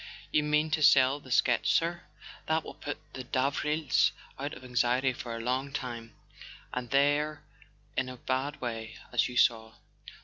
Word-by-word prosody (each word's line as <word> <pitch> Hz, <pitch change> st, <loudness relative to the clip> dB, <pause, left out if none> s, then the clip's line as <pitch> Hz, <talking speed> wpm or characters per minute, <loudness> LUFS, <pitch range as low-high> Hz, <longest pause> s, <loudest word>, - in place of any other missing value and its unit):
"You 150 Hz, -, +3 dB
mean 150 Hz, +1 st, +1 dB
to 155 Hz, -, +1 dB
sell 135 Hz, -1 st, +6 dB
the 135 Hz, -, -15 dB
sketch, 120 Hz, 0 st, +3 dB
sir? 170 Hz, +1 st, +1 dB, 0.5 s
That 160 Hz, 0 st, +1 dB
will -, -, -8 dB
put 145 Hz, -, -5 dB, 0.2 s
the 130 Hz, -, -6 dB
Davrils 145 Hz, +3 st, +1 dB, 0.3 s
out 140 Hz, +2 st, -4 dB
of 130 Hz, -, -12 dB
anxiety 125 Hz, +1 st, +1 dB
for 120 Hz, -1 st, -6 dB
a -, -, -5 dB
long 130 Hz, +4 st, -1 dB
time; 120 Hz, -5 st, -5 dB, 0.6 s
and 125 Hz, -1 st, -3 dB
they're 145 Hz, +3 st, +2 dB, 0.5 s
in 130 Hz, -1 st, 0 dB
a 125 Hz, -, -8 dB
bad 130 Hz, +4 st, -2 dB
way, 115 Hz, -2 st, -5 dB, 0.2 s
as -, -, +2 dB
you 125 Hz, -, -5 dB
saw." 110 Hz, -2 st, +3 dB
130 Hz, 165 wpm, -30 LUFS, 125-145 Hz, 0.6 s, sell